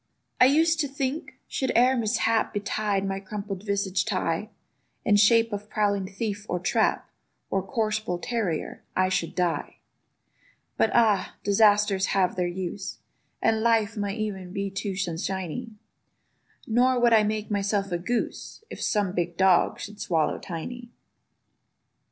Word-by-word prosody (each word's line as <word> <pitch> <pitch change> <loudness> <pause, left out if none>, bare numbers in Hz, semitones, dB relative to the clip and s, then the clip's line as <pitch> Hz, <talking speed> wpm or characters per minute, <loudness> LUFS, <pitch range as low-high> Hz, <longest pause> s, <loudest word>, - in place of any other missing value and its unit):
I - - +8
used 320 +4 +3
to 295 - +1
think, 275 +2 -3
should 265 - -1
e'er 250 +2 +5
mishap 225 -1 +1
Betide 205 -1 -1
my 195 0 -2
crumple 200 0 -5
visaged 200 0 -1
Ti, 185 +1 -1 0.6
In 210 - +4
shape 225 +2 +5
of 205 +1 -5
prowling 200 -3 0
thief, 205 +1 -4
or 180 - 0
trap, 180 - +1 0.4
Or 195 - +1
coarse 215 +2 -1
bull 180 -5 -3
terrier—I 185 -2 -2
should 175 -3 -1
die. 175 -2 -1 1.0
But - - +2
ah! 220 -5 +3
disasters 205 -1 +4
have 185 -2 +2
their 180 -1 0
use; 185 +2 -5 0.5
And 220 -1 +3
life 225 -1 +2
might 205 0 -2
e'en 195 -4 -4
be 200 0 -3
too 195 0 -3
sunshiny: 185 +4 -3 1.0
Nor 250 +2 +3
would 240 -1 +4
I 220 - +7
make 215 0 -2
myself 200 -1 0
a 175 - -1
goose, 240 - -3
If - - -7
some 205 -4 +1
big 175 -2 -2
dog 190 -2 +4
should 210 0 -8
swallow 160 -3 0
Tiny. 235 +8 -7
205 Hz, 140 wpm, -26 LUFS, 190-225 Hz, 1.0 s, I